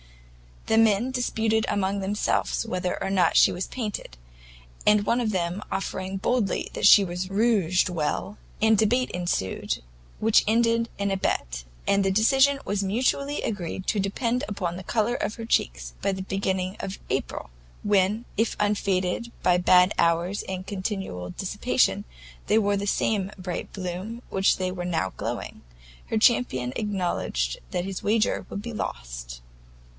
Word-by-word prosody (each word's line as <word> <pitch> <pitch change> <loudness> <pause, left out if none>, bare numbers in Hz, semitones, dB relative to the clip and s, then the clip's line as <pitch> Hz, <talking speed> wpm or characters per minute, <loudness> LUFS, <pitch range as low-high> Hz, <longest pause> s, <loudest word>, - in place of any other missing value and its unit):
The 220 - +3
men 225 +3 +3
disputed 225 -3 0
among 200 0 0
themselves 205 +3 0
whether 185 -4 -2
or 195 - -1
not 180 -4 +3
she - - +7
was 180 - -3
painted; 215 - -5 0.7
and 210 -1 +5
one 235 - +2
of 225 - 0
them 180 0 -1
asserting 190 0 -3
boldly 215 +1 0
that - - +3
she 205 - +9
rouged 190 0 +1
well, 175 +4 -2 0.2
a 220 0 +5
debate 235 +5 +2
ensued, 175 - -2 0.4
which 225 0 +4
ended 230 +1 +2
in 200 0 -1
a 195 - +1
bet, - - -2 0.2
and 200 0 +3
the 195 - +2
decision 270 +8 +4
was 205 0 -1
mutually 255 +8 0
agreed 185 -3 -3
to 210 - +1
depend 230 +5 -1
upon 185 -4 -3
the 185 - -7
colour 225 +3 0
of 215 - -2
her 230 - -6
cheeks - - 0
by - - +1
the 190 - -4
beginning 190 -1 -2
of 195 - -5
April, - - -3 0.3
when, 205 +3 +2
if 225 +1 +1
unfaded 200 +1 0
by 180 -1 +4
bad 180 +1 +5
hours 170 +4 +2
and 185 -1 -5
continual 190 - -4
dissipation, - - 0 0.4
they 215 - +4
wore 205 -2 +2
the 200 +1 -3
same 200 -1 +1
bright 180 -2 -5
bloom 185 +3 -4
with 240 - -15
which 195 0 +3
they 185 -1 -1
were 180 -1 -5
now 160 - -1
glowing, - - -5 0.5
her 225 - -1
champion 215 - +2
acknowledged 175 - -1
that 180 0 -2
his 195 -1 -4
wager 215 +1 +1
would 200 - -5
be 235 +2 -6
lost. - - -6
195 Hz, 155 wpm, -26 LUFS, 180-220 Hz, 0.7 s, she